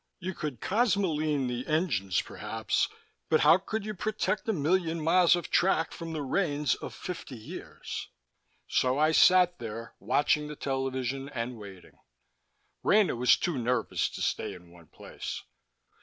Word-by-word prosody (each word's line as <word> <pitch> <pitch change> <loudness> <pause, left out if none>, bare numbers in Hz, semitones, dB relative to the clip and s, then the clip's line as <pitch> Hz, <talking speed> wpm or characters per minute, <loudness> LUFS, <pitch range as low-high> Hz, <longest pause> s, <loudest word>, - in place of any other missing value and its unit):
You 185 0 -4
could 150 -8 -5
cosmoline 170 - +1
the 125 0 -3
engines, 145 - +1
perhaps, - - -2 0.4
but - - +4
how 170 - +6
could 210 +2 -4
you 215 - -3
protect 210 +1 -2
a - - +5
million 170 -1 +1
miles 175 +2 +5
of 175 - -5
track 175 -3 +2
from 165 -1 -7
the 155 -2 -3
rains 145 -2 +1
of - - -7
fifty 175 -7 -6
years? 110 - -7 0.6
So 130 +1 +1
I 155 +1 +4
sat 180 +1 +5
there, 115 0 -7
watching 150 +1 +1
the 150 - -7
television 135 0 -2
and 120 -2 -4
waiting. 100 -4 -12 0.8
Rena 205 -7 +4
was 125 +1 +5
too 165 -7 -1
nervous 125 +1 0
to - - -5
stay - - -1
in 90 -1 -15
one 85 -2 -17
place. - - -7
150 Hz, 150 wpm, -29 LUFS, 125-180 Hz, 0.8 s, how